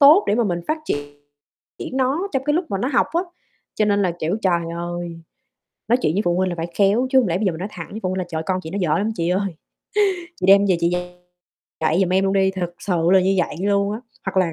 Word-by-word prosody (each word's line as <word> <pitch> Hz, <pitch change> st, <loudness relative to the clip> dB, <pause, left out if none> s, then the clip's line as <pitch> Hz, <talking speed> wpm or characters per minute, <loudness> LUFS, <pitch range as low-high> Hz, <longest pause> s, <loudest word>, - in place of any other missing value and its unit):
tốt 300 Hz, +8 st, +8 dB
để -, -, +3 dB
mà 235 Hz, +1 st, +2 dB
mình 175 Hz, -4 st, -1 dB
phát 315 Hz, -, 0 dB, 0.8 s
triển 260 Hz, -, -9 dB
nó 275 Hz, +9 st, +1 dB
trong 270 Hz, 0 st, -1 dB
cái 295 Hz, +1 st, +1 dB
lúc 350 Hz, +3 st, +1 dB
mà 195 Hz, -, -1 dB
nó 250 Hz, -, -1 dB
học 245 Hz, -4 st, +2 dB
á, 340 Hz, -, +3 dB, 0.5 s
cho 215 Hz, -, +2 dB
nên 205 Hz, -1 st, +2 dB
là, 180 Hz, -3 st, +1 dB
kiểu, 165 Hz, +6 st, 0 dB
trời 175 Hz, -3 st, +2 dB, 0.2 s
ơi, 175 Hz, -1 st, -5 dB, 0.7 s
nói 240 Hz, +3 st, +4 dB
chuyện 155 Hz, -, +1 dB
với 205 Hz, -, +2 dB
phụ 175 Hz, 0 st, +2 dB
huynh 185 Hz, 0 st, +1 dB
là 175 Hz, -, -3 dB
phải 165 Hz, 0 st, -3 dB
khéo, 205 Hz, +6 st, +3 dB
chứ 265 Hz, -, +6 dB
hông 245 Hz, -, +1 dB
lẽ 170 Hz, 0 st, 0 dB
bây 210 Hz, -, -1 dB
giờ 190 Hz, -, +2 dB
mình 160 Hz, -, -7 dB
nói 190 Hz, -, -3 dB
thẳng 165 Hz, -4 st, -7 dB
với 215 Hz, -, -5 dB
phụ 185 Hz, -, 0 dB
huynh 185 Hz, -, -2 dB
là 185 Hz, -, -2 dB
"Trời 160 Hz, -2 st, -3 dB
ơi, -, -, -4 dB
con 185 Hz, -1 st, +1 dB
chị 160 Hz, -, -6 dB
nó 195 Hz, -, -3 dB
dở 155 Hz, -4 st, +2 dB
lắm 210 Hz, +2 st, 0 dB
chị 170 Hz, -2 st, -1 dB
ơi, 190 Hz, -1 st, -1 dB, 0.8 s
chị -, -, -3 dB
đem 200 Hz, +1 st, +7 dB
về 185 Hz, -3 st, +2 dB
chị 170 Hz, 0 st, +2 dB
dạy 180 Hz, 0 st, -3 dB, 0.7 s
lại 160 Hz, +3 st, +3 dB
giùm 190 Hz, -, +2 dB
em 190 Hz, +1 st, +3 dB
luôn 195 Hz, -, +1 dB
đi!" 190 Hz, -1 st, +3 dB
Thực 180 Hz, -2 st, -4 dB
sự 175 Hz, -3 st, 0 dB
là 190 Hz, -, +7 dB
như 190 Hz, +1 st, +2 dB
vậy 170 Hz, -3 st, 0 dB
luôn 200 Hz, 0 st, +1 dB
á. 215 Hz, -, -5 dB, 0.3 s
Hoặc 195 Hz, -, -3 dB
là 180 Hz, -3 st, +3 dB
190 Hz, 280 wpm, -21 LUFS, 175-210 Hz, 0.8 s, tốt